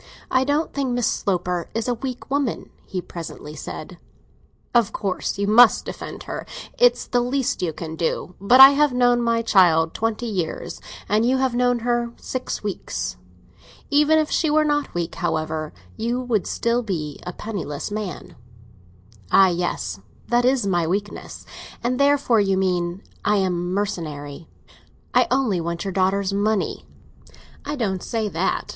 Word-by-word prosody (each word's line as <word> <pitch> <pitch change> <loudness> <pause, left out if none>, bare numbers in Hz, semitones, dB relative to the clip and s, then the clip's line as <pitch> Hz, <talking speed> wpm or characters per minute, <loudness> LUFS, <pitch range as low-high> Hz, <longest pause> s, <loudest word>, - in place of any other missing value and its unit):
"I 260 - +3
don't 290 +3 0
think 275 -3 -1
Miss 245 -2 0
Sloper 180 -2 -1
is 225 +1 -1
a 245 - +2
weak 255 +2 -6
woman," 280 -4 -1 0.2
he 185 - -3
presently 165 -3 -8
said. - - -8 0.7
"Of 235 -4 +3
course 195 -2 -2
you 200 - 0
must 225 +3 +6
defend - - -7
her—it's - - 0
the 245 - +1
least 255 +1 -1
you 175 -3 0
can 160 0 -7
do. 170 +2 -2
But 245 +6 +5
I 270 0 +13
have 290 -1 +2
known 245 -1 +3
my 230 -1 +1
child 165 -6 +4
twenty 225 +1 -2
years, 185 -8 -4 0.3
and 210 +3 +2
you 255 +3 +3
have 260 -2 +1
known 245 0 +2
her 240 -1 0
six 255 -3 -4
weeks. 205 -2 -4 0.8
Even 300 +2 +5
if 310 -1 +1
she 320 - +2
were 305 +1 +4
not 295 -1 0
weak, 170 -1 -2
however, 155 -1 -2 0.3
you 235 +2 -1
would 240 -6 -1
still 235 +1 0
be 160 - -4
a 180 - -6
penniless 175 -7 -5
man." 205 -3 -5 1.0
"Ah, 195 -1 +7
yes; 170 - -2 0.3
that 240 0 +3
is 255 -4 +2
my 175 -4 +1
weakness! 200 +4 -4 0.4
And 250 +2 0
therefore, 280 -5 +3
you 195 -2 +2
mean, 180 0 -1 0.2
I 210 - +3
am 180 -3 0
mercenary—I 160 -7 -4
only 250 -9 +1
want 170 +1 -3
your 195 - -3
daughter's 195 +1 +1
money." 210 +1 -1 0.8
"I 295 +1 -3
don't 195 -8 -1
say 225 -3 -2
that. - - -1
210 Hz, 155 wpm, -22 LUFS, 180-245 Hz, 1.0 s, I